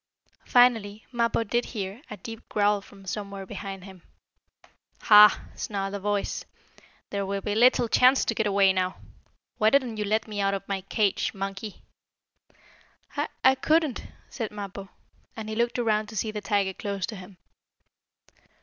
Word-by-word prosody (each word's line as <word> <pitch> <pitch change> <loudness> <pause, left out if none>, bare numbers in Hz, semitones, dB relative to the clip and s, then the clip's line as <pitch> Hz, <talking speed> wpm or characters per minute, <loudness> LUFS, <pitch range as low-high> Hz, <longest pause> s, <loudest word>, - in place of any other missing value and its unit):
Finally 225 -4 +3
Mappo 235 -1 +1
did 240 +3 0
hear 205 +1 -5
a 210 - -7
deep 225 -1 -10
growl 205 -1 +2
from 195 0 -16
somewhere 200 0 -5
behind 195 -1 -7
him. 190 -2 -12 1.0
"Ha!" 210 -1 +7
snarled 195 -1 -4
a 200 - -3
voice. 205 0 -2 0.7
"There 200 -1 -1
will 195 0 -3
be 205 - -2
little 240 +2 +4
chance 255 +4 +4
to - - 0
get 220 -1 0
away 195 -1 +4
now! 185 0 -1 0.6
Why 215 - +5
didn't 255 -4 +1
you 210 - -1
let 220 +2 0
me 210 -1 -3
out 195 0 +1
of 195 0 -7
my 195 -1 -2
cage, 200 +2 0
monkey?" 195 +1 -6 1.3
"I - - -1 0.2
I 260 - +7
couldn't," 310 0 +1 0.2
said 225 -5 -5
Mappo, 200 -2 -8 0.5
and 220 -1 -6
he 220 - -4
looked 235 +2 0
around 215 -3 +1
to 220 - -10
see 215 +2 -1
the 210 -1 -5
tiger 200 -2 0
close 200 -1 -3
to 220 - -7
him. 185 -1 -12
205 Hz, 160 wpm, -26 LUFS, 195-225 Hz, 1.3 s, Ha